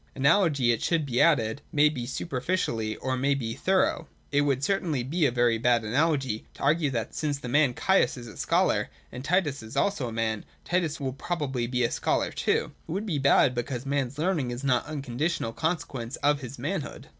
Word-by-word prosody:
Analogy 140 -3 +3
it 115 - -1
should 165 -3 +1
be 125 -3 +1
added 125 -6 +3
may 150 0 +5
be 130 -6 -3
superficial 130 0 -2 0.2
or 130 - -1
it - - -1
may 140 +2 +2
be 115 -4 -3
thorough. 185 -1 +1 0.2
It 145 0 +3
would 140 -2 +1
certainly 165 -8 0
be 155 +4 +1
a - - -1
very 120 -2 +2
bad 120 -1 +3
analogy 135 -1 0
to - - -9
argue 150 +1 +3
that 115 -4 -3
since 150 -2 -1
the 135 - -8
man 135 -1 +3
Caius 190 -7 +2
is 120 - -8
a 110 - -10
scholar, - - +1 0.2
and 125 - -7
Titus 155 -4 +1 0.2
also 200 -10 +1
is - - -3
a - - -7
man, 110 -1 -1 0.2
Titus 170 -4 0
will 135 -2 -2
probably 135 -5 -2
be 125 0 0
a 120 - +1
scholar - - 0
too: - - +1
and - - -11 0.2
it - - -7
would 200 +4 -2
be 165 -9 -1
bad 135 -1 +4
because 125 +1 -3
a - - -5
man's 140 -1 -1
learning 160 -5 0
is 120 +2 -5
not 125 -3 +2
an 155 - -6
unconditional 140 -1 -2
consequence 140 -7 -3
of 145 0 +1
his 130 +1 -7
manhood. 155 +5 -4
140 Hz, 215 wpm, -27 LUFS, 120-155 Hz, 0.2 s, may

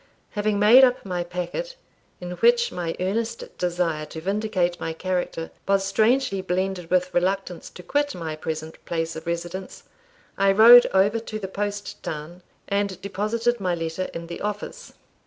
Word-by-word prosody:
Having 210 0 0
made 220 +6 +7
up 250 -4 +3
my 180 -2 -2
packet, 180 - -5 0.4
in 180 0 -6
which 235 +4 +4
my 170 -2 -3
earnest 225 +5 -3
desire 175 -3 0
to 160 - -8
vindicate 190 -1 -1
my 160 - -3
character 175 -1 -3 0.2
was 195 0 +2
strangely 220 -1 +2
blended 185 -1 -2
with 180 0 +1
reluctance 185 0 -1
to 180 - -12
quit 290 +9 0
my 160 -3 -4
present 155 0 -6
place 165 -1 -2
of 160 +1 -8
residence, 175 +2 -5 0.6
I 195 0 +4
rode 235 +4 +9
over 200 +4 +2
to 220 -1 -6
the 200 -3 -5
post 205 +1 -4
town, 160 +4 -6 0.3
and 200 -2 -1
deposited 220 +5 -1
my 180 -3 0
letter 165 +2 -3
in 170 0 -6
the 170 0 -7
office. 210 - -5
190 Hz, 155 wpm, -24 LUFS, 175-210 Hz, 0.6 s, rode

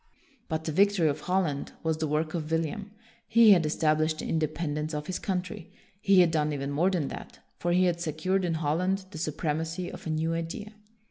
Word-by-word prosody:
But 160 -1 -2
the 160 - -2
victory 195 0 +3
of 140 - -2
Holland 180 -6 -1
was 160 -1 0
the 160 0 -1
work 155 +1 -1
of 160 -3 -3
William. 165 +5 -1 0.4
He 225 -1 +7
had 170 -5 +5
established 155 0 +1
the - - -5
in 160 - +1
dependence 155 0 -2
of 150 0 -4
his 185 - -3
country. 185 0 -4 0.3
He 195 -2 +6
had 170 -2 +4
done 150 -2 +1
even 140 0 -3
more 165 +6 +2
than 170 -7 -1
that, - - -9 0.2
for 175 - 0
he 180 +1 +4
had 170 -1 0
secured 175 +4 0
in 170 -2 0
Holland 180 +5 0
the 155 - -7
supremacy 160 +3 -2
of - - -9
a - - -2
new 160 +1 0
idea. 165 +6 -5
160 Hz, 205 wpm, -28 LUFS, 155-180 Hz, 0.4 s, He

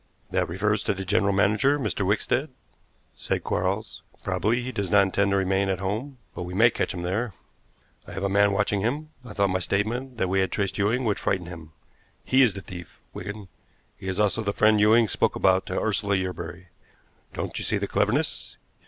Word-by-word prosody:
"That - - 0
refers 105 +4 0
to 105 - +1
the 95 0 -5
general 100 +1 +2
manager, 105 +8 +3
Mr. 110 - -2
Wickstead," - - 0 0.7
said - - -2
Quarles. - - -2 0.2
"Probably 120 +4 0
he 130 - -4
does 100 -6 -3
not 100 +1 +6
intend 100 +1 +1
to 100 - +2
remain 95 +1 +1
at 95 - 0
home, 110 +9 -3 0.2
but - - -6
we 90 +1 -5
may 115 +4 +6
catch - - -1
him 90 -3 -5
there. 100 +5 -1 0.7
I - - -9
have 95 - -4
a - - +2
man 100 +1 +4
watching 100 0 +1
him. 145 +8 -2
I 120 -4 -9
thought 100 -2 +1
my 95 - +1
statement 115 +7 -2
that 95 - +1
we 95 +1 +1
had 95 - +1
traced 100 +1 -1
Ewing 115 +5 +1
would 105 -3 0
frighten 95 -3 -1
him. 80 -2 -10 0.5
He 130 +1 +4
is 115 -7 +4
the 100 - -6
thief, 90 -3 -10
Wigan. 100 +1 -7 0.5
He 95 - -9
is 95 +1 -2
also 105 +2 +2
the 100 -2 -1
friend 110 0 +4
Ewing 110 +2 +5
spoke - - +1
about 95 0 +3
to - - -1
Ursula 100 -1 +1
Yerbury. 90 -1 -4 0.7
Don't - - -3
you - - -4
see - - 0
the - - -1
cleverness? - - 0
100 Hz, 205 wpm, -25 LUFS, 95-110 Hz, 0.7 s, not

